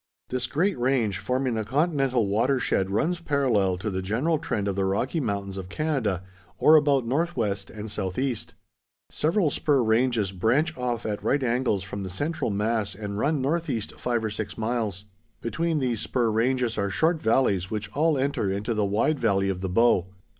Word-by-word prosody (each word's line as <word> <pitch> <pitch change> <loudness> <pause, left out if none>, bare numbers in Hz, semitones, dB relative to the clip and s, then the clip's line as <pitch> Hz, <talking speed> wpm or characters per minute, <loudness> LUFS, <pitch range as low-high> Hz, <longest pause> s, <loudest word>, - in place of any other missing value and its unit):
This 125 -1 -1
great 170 +6 0
range, 120 -6 +1
forming 125 +5 -1
the 110 -1 -1
continental 135 -2 +1
water 120 +7 +2
shed 95 -6 0
runs 160 - 0
parallel 125 - +1
to 105 +3 -3
the 95 0 -2
general 130 - 0
trend 105 -9 -2
of 100 - -1
the 100 - 0
Rocky 110 - 0
Mountains 100 -6 -3
of 95 -1 -6
Canada, 120 - -1 0.3
or 155 - +6
about 145 -4 +4
northwest 115 - -1
and 105 -1 -7
southeast. 105 +6 -3 0.6
Several 165 0 +1
spur 140 -4 +2
ranges 110 -3 +2
branch 125 - +1
off 120 -2 -2
at 105 -1 -2
right 140 -1 +1
angles 120 -5 +1
from 100 +1 -6
the 95 - -5
central 145 - -2
mass 105 0 -1
and 100 0 -5
run 145 +3 +1
northeast 140 -7 -1
five 120 -2 -1
or 110 - -2
six 105 0 -5
miles. 110 -4 -2 0.3
Between 165 +7 -1
these 125 -6 0
spur 120 -3 0
ranges 120 0 +1
are 100 0 0
short 160 - +1
valleys 110 -6 +2
which 105 -1 -4
all 155 0 +2
enter 135 -7 0
into 105 +4 -2
the 105 -1 0
wide 115 +9 +1
valley 100 -4 +2
of 95 -1 -3
the 95 - -2
Bow. 95 -2 +3
115 Hz, 180 wpm, -26 LUFS, 100-140 Hz, 0.6 s, or